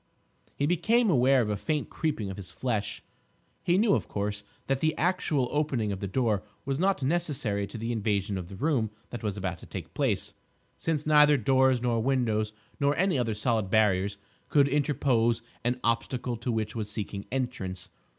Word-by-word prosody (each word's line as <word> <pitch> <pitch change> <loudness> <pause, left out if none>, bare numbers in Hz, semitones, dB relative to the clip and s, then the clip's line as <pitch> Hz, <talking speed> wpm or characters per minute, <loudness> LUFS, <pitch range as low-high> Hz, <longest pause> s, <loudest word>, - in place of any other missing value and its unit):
He 140 - 0
became 210 +7 +3
aware 130 -2 +4
of 105 - -2
a - - 0
faint 150 +8 -2
creeping 115 -11 -2
of - - -6
his 95 -2 -7
flesh. 110 -1 -2 0.6
He 175 +1 +3
knew, 210 0 +4
of - - 0
course, 105 0 -3 0.2
that 135 -1 0
the 155 +1 +1
actual 165 -7 +1
opening 140 -8 0
of 95 - -4
the 100 - -3
door 110 -1 +1 0.2
was 135 0 -1
not 190 -5 +1
necessary 135 -10 0
to - - -8
the 115 +2 -3
invasion 105 -3 0
of 90 -2 -5
the 100 - -8
room 125 -1 +1 0.2
that 120 - -5
was 105 -3 -2
about 95 -3 -3
to - - -13
take - - -7
place, - - 0 0.4
since 155 -2 -2
neither 150 -1 +6
doors 130 0 +3
nor 120 -2 +1
windows, 110 -4 +1 0.3
nor 140 0 +2
any 180 -4 +2
other 115 -3 0
solid 110 -2 0
barriers 100 -2 +2 0.3
could 140 -2 +5
interpose 130 -5 +1 0.2
an 125 +1 0
obstacle 120 +1 0
to 120 +2 -3
what 110 -1 -2
was 110 -3 -4
seeking 105 -2 -5
entrance. 120 -9 -3
120 Hz, 180 wpm, -28 LUFS, 105-145 Hz, 0.6 s, neither